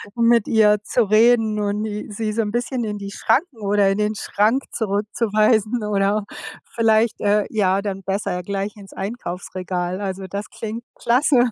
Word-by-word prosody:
mit 235 -1 +3
ihr 210 -2 +4
zu 240 +3 +1
reden 220 0 +4
und 205 +1 -1
i 210 -1 -5
sie 215 +1 -2
so 225 - +1
'n 210 -2 -2
bisschen 245 +2 -2
in 210 -2 -3
die 200 0 -7
Schranken 275 - 0
oder 200 -1 +3
in 195 - 0
den 210 0 0
Schrank 215 +6 +1
zurückzuweisen 215 +1 +1
oder 205 0 +1 0.5
vielleicht, 225 0 +2
äh, 205 0 +2
ja, 195 -2 +1
dann 195 -1 -4
besser 195 -1 -2
gleich 200 +2 -3
ins 200 -2 -13
Einkaufsregal. 185 -3 -4
Also, 190 -1 -4
das 200 +3 -5
klingt 225 +2 -6
klasse. 250 0 +3
210 Hz, 160 wpm, -21 LUFS, 200-225 Hz, 0.5 s, ihr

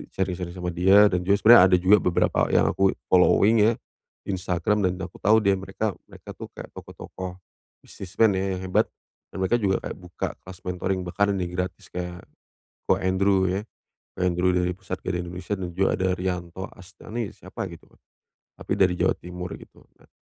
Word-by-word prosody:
sharing-sharing 90 -2 -3
sama 90 -1 -3
dia 95 +4 +5
dan 90 - +1
juga 100 - +5
sebenernya 115 -3 +9
ada 90 - +4
juga 95 +4 +5
beberapa 90 0 +1
yang - - +3
aku 95 -1 +2 0.2
following 100 +4 +5
ya 115 - +3 0.5
Instagram, 95 +2 0
dan 90 0 0
aku 90 -1 -7
tahu 110 +3 +4
dia 100 -1 +4
mereka 95 +3 -3 0.2
mereka - - -12
tuh - - -9
kayak - - -9
tokoh-tokoh 95 -1 -8 0.5
business 95 0 -11
man 110 - +6
ya 95 0 -1
yang - - -7
hebat, - - +2 0.5
dan 95 - -5
mereka 120 +6 +2
juga 95 -3 0
kayak - - -6
buka 90 -1 -5 0.2
kelas 95 -1 -11
mentoring 90 +1 -2
bahkan 100 +3 0
ini 90 -2 -2
gratis, 90 0 -5
kayak 90 0 -6 0.7
Koh - - +3
Andrew 95 +1 +2
ya, 95 +3 -1 0.5
Koh 90 - -5
Andrew 90 0 +2
dari 90 0 +1
Pusat 95 0 -7
Gadai 90 -1 -2
Indonesia 90 +3 -4
dan 90 - -4
juga 95 +1 +2
ada 95 0 +1
Riyanto 90 0 -4
Asteni 100 +4 -7
siapa - - -7
gitu, - - -14
Kak, - - -26 0.6
tapi - - -9
dari 95 -2 +4
Jawa 90 - +1
Timur 90 0 -7
gitu. - - -17 0.2
Nah, - - -24
95 Hz, 185 wpm, -25 LUFS, 90-95 Hz, 0.7 s, sebenernya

